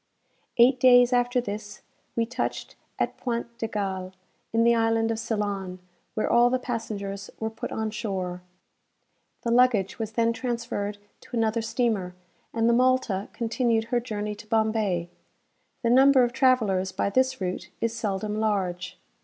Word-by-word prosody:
Eight 250 +2 +6
days 245 0 +6
after 245 +1 +2
this, 205 -2 -6 0.3
we 230 - +1
touched 245 +2 -4 0.2
at - - -1
Point 235 -1 -3
de 225 - -1
Galle, 190 -3 -3 0.4
in 225 0 +3
the 235 0 +5
island 225 0 +2
of 225 - -2
Ceylon, 205 -5 -2 0.4
where 215 - 0
all 240 +1 +5
the 255 - +2
passengers 200 -5 -5
were 220 0 -2
put 220 - -6
on 220 -1 -2
shore. 190 -5 -3 1.0
The 235 - 0
luggage 235 -6 +3
was 220 -1 -4
then 230 0 +2
transferred 230 -4 -3 0.2
to 245 - -7
another 225 0 +1
steamer, 225 -6 -1 0.4
and 230 0 +1
the 235 - +4
"Malta" 250 -5 +2
continued 230 -1 0
her 240 - +4
journey 210 -3 -4
to 215 +1 -12
Bombay. 215 -6 0 0.7
The 235 - +2
number 265 +1 +6
of 240 0 0
travellers 220 -8 +2
by 200 - -1
this 260 +3 +2
route 185 -1 -4
is 230 0 -1
seldom 210 -1 -2
large. 185 -4 -1
225 Hz, 155 wpm, -26 LUFS, 205-240 Hz, 1.0 s, Eight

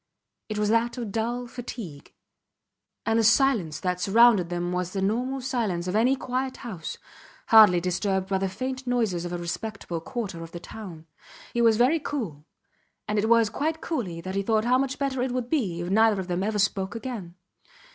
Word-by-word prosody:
It 215 - -3
was 210 0 +1
that 230 +3 +1
of 230 -4 -4
dull 235 +3 -2
fatigue. 230 - -8 0.9
And 225 0 +2
the - - +3
silence 220 - +3
that 180 -1 -1
surrounded 210 -3 +5
them 175 0 -2
was 180 0 -2
the 195 - -2
normal 250 +6 -1
silence 220 -9 -1
of 180 - -2
any 245 +5 +4
quiet 260 0 -3
house, 185 -9 -6 0.5
hardly 210 -6 +8
disturbed 185 +2 -1
by 195 -1 0
the 195 0 -1
faint 260 +6 -5
noises 220 -8 0
of 175 - -4
a 175 - -2
respectable 175 0 -5
quarter 205 -5 -5
of 165 0 -9
the 175 - -5
town. 175 -5 -9 0.5
He 235 - +1
was 225 -2 +5
very 260 +8 +4
cool 215 - -4 0.6
and 210 0 0
it 220 +2 0
was 230 -2 +4
quite 320 +2 -1
coolly 200 - -3
that 185 +2 -5
he 195 - 0
thought 220 +2 +1
how 250 +1 +4
much 270 0 -1
better 275 -2 -1
it 250 0 -1
would 250 -1 -3
be 195 - 0
if 175 +1 -4
neither 220 0 +4
of 185 - -4
them 175 0 -1
ever 210 +2 -1
spoke 200 +1 0
again. 225 -8 -6
215 Hz, 195 wpm, -26 LUFS, 180-245 Hz, 0.9 s, hardly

